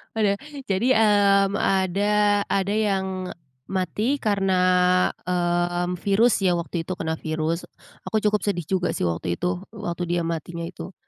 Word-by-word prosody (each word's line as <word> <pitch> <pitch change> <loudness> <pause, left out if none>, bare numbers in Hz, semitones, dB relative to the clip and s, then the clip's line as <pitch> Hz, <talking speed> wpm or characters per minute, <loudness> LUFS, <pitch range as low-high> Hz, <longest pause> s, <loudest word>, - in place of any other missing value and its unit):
Udah, 205 -2 +2 0.3
jadi, 200 +6 +1
mmm, 200 -2 +4
ada 195 +1 +1 0.4
ada 195 +1 0
yang 190 -3 -1
e - - -8 0.3
mati 195 - -1
karena, 200 -7 0 0.7
mmm, 175 0 0
virus 205 +3 +3
ya 185 -3 +2
waktu 170 -1 -3
itu 185 - -3
kena 160 -2 -3
virus, 160 +1 -2 0.4
aku 215 -1 0
cukup 210 0 +2
sedih 195 -4 -1
juga 180 +3 -1
sih - - -2
waktu 85 0 -1
itu, 180 0 -2 0.2
waktu 180 -4 -4
dia 175 0 0
matinya 170 +1 -4
itu. 175 +3 -8
185 Hz, 145 wpm, -24 LUFS, 175-200 Hz, 0.7 s, mmm